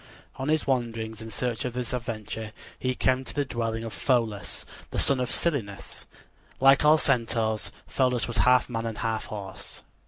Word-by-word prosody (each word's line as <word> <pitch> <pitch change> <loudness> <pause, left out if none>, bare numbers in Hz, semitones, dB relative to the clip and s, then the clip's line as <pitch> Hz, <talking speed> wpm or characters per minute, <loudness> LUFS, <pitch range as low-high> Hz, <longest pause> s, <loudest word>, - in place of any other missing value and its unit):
On 135 +2 -3
his 155 0 +2
wanderings 115 -4 -1
in 110 - -7
search 115 +2 -2
of 125 - -3
this 125 0 -3
adventure 110 -2 -4 0.3
he 130 0 0
came 130 +1 +2
to - - -9
the 145 -1 +1
dwelling 115 -3 -2
of 115 - -5
Pholus, 115 -6 0 0.2
the - - -5
son 135 -2 +3
of 125 -1 0
Silenus. 120 -12 -1 0.5
Like 135 +2 +6
all 150 +1 +7
Centaurs, 115 -6 +1
Pholus 125 -2 +1
was 120 -1 -2
half 125 0 +5
man 115 -2 -2
and 110 -1 -4
half 110 -1 -1
horse. 100 -3 -7
120 Hz, 175 wpm, -27 LUFS, 110-130 Hz, 0.5 s, all